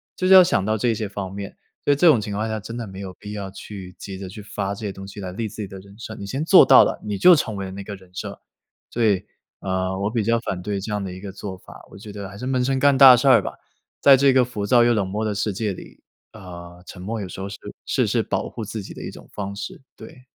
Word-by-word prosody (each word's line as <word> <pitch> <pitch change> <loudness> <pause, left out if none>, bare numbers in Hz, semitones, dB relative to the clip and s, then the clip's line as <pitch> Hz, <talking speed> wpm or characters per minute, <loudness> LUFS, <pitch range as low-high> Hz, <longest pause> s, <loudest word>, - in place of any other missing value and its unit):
就 185 - -3
是 190 - +7
要 190 -1 +10
想 170 - +1
到 110 +1 0
这 115 +2 +1
些 110 0 -3
方 100 -2 -6
面。 100 0 -7 0.3
所 - - +4
以 - - +1
这 145 - +2
种 150 -8 +6
情 105 -1 -5
况 110 +2 -2
下 110 0 -2
真 115 +3 -8
的 120 -1 -4
没 95 -2 -10
有 95 -2 -7
必 105 0 -9
要 100 -2 -5
去 95 -1 -10
急 95 -2 -8
着 95 - -6
去 105 +3 -9
发 100 -1 -4
这 105 - -7
些 100 - -2
东 95 0 -10
西 100 +1 -9
来 90 -1 -5
立 110 +4 -3
自 110 +1 -8
己 100 - -4
的 95 - -9
人 100 +2 -16
设， 110 -1 -8
你 100 - -8
先 135 +9 -3
做 - - +7
到 - - +8
了， - - -2
你 105 -1 -2
就 180 - +8
成 110 -8 -2
为 100 - -4
了 95 - -7
那 100 +1 -7
个 100 +1 -7
人 95 -1 -17
设。 - - -7 0.5
所 115 -1 0
以， 100 -2 +2 0.4
呃， 95 0 -2
我 100 +2 -1
比 115 -1 0
较 115 +1 +3
反 95 -6 -4
对 100 +1 -3
这 105 - -5
样 105 -1 -1
的 95 -2 -5
一 95 - -10
个 100 -1 -7
做 95 -1 -7
法， - - -15
我 - - -12
觉 105 +1 -10
得 100 -1 -7
还 100 - -11
是 125 - -6
闷 130 -1 0
声 135 +1 +1
干 140 0 +4
大 130 -2 +10
事 120 - 0
儿 - - +7
吧。 - - -5 0.5
在 135 -1 +8
这 140 0 +4
个 130 -1 +5
浮 110 -5 -4
躁 120 +3 +5
又 120 0 +4
冷 100 -4 0
漠 105 +3 -3
的 105 -1 -1
世 100 +1 -1
界 105 +2 -2
里， - - -13 0.3
呃， 90 -3 -11
沉 90 - -10
默 110 +4 -4
有 95 - -5
时 90 - -9
候 95 - -4
是 100 - -8 0.3
是 - - +1
是 - - +1
保 - - -2
护 110 - -6
自 105 0 -6
己 - - -9
的 - - -10
一 - - -5
种 - - -14
方 100 -1 -5
式， 100 - -7
对。 125 - -13
105 Hz, 325 characters per minute, -22 LUFS, 95-115 Hz, 0.5 s, 要